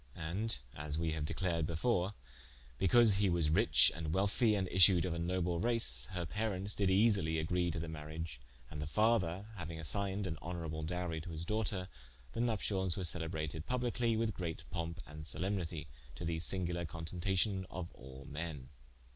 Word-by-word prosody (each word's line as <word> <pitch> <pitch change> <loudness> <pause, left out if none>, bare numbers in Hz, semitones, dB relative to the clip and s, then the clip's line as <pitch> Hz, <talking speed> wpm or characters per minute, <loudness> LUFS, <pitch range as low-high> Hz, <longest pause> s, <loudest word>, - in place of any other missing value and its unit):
And 90 - -2 0.2
(as 75 0 -3
we 80 0 0
haue 80 -1 -2
declared 85 0 0
before) 90 +2 +1 0.7
because 105 +1 +6
he 100 -1 +3
was 85 -3 +2
ritche 80 - +6
and 80 -1 -4
wealthie, 100 +3 +3
and 95 -2 0
issued 90 -1 +6
of 90 - -1
a 85 - -3
noble 90 0 0
race, 115 - +4
her 90 -2 -2
parentes 105 +2 -1
did 100 -2 +2
easely 95 -5 +4
agree 85 +3 +1
to 85 - -2
the 85 - -4
mariage: 80 -3 -6 0.3
and 75 -1 -5
the 75 - -3
father 100 -1 +2
hauing 80 -1 -5
assigned 95 +6 -1
an 80 -4 -3
honourable 80 -3 -4
dowrie 85 0 -2
to 85 - -8
his 80 0 -5
doughter, 105 -2 -1 0.5
the - - -4
Nupcials 100 -6 0
were 95 - -2
celebrated 80 -2 -3
publikely 120 -2 +1
with 110 -1 +1
greate 85 -3 -4
pompe 85 0 -3
and 75 +1 -9
solemnitie, 85 -4 -2 0.3
to 85 - -5
the 80 -1 -1
singuler 85 0 -2
contentation 90 +4 -1
of 85 -1 -6
all 65 +1 -11
men. 75 -4 -5
85 Hz, 170 wpm, -35 LUFS, 80-100 Hz, 0.7 s, because